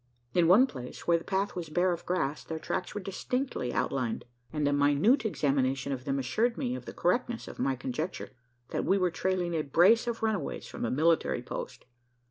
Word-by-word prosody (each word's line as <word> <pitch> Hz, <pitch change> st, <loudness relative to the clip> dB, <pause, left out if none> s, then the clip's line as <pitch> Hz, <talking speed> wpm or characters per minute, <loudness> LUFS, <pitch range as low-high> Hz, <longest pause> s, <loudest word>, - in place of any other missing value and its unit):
In 175 Hz, -2 st, +4 dB
one 205 Hz, +9 st, +7 dB
place, 125 Hz, -, -8 dB
where 170 Hz, -1 st, +4 dB
the -, -, -12 dB
path 195 Hz, +1 st, -1 dB
was 170 Hz, -3 st, -4 dB
bare 175 Hz, +4 st, +2 dB
of 170 Hz, -, -5 dB
grass, 155 Hz, -5 st, -1 dB
their 160 Hz, -, -5 dB
tracks 180 Hz, +5 st, -3 dB
were 205 Hz, -, -2 dB
distinctly 195 Hz, -, -2 dB
outlined; 125 Hz, -4 st, -1 dB, 0.3 s
and 150 Hz, -2 st, 0 dB
a 145 Hz, -, +2 dB
minute 145 Hz, -, +3 dB
examination 135 Hz, -, 0 dB
of 130 Hz, -1 st, -4 dB
them 135 Hz, 0 st, 0 dB
assured 225 Hz, -, 0 dB
me 250 Hz, -3 st, -1 dB
of 255 Hz, -, -6 dB
the -, -, -7 dB
correctness 235 Hz, +6 st, 0 dB
of -, -, -9 dB
my 135 Hz, -1 st, +1 dB
conjecture 130 Hz, +7 st, -4 dB, 0.4 s
that -, -, -1 dB
we 195 Hz, -, +3 dB
were 180 Hz, -2 st, +2 dB
trailing 180 Hz, 0 st, -1 dB
a 160 Hz, -, +1 dB
brace 180 Hz, -, +4 dB
of 230 Hz, -1 st, -3 dB
runaways 210 Hz, -9 st, -1 dB
from -, -, -5 dB
a -, -, 0 dB
military 160 Hz, +5 st, +2 dB
post. -, -, -6 dB
170 Hz, 200 wpm, -30 LUFS, 140-200 Hz, 0.4 s, one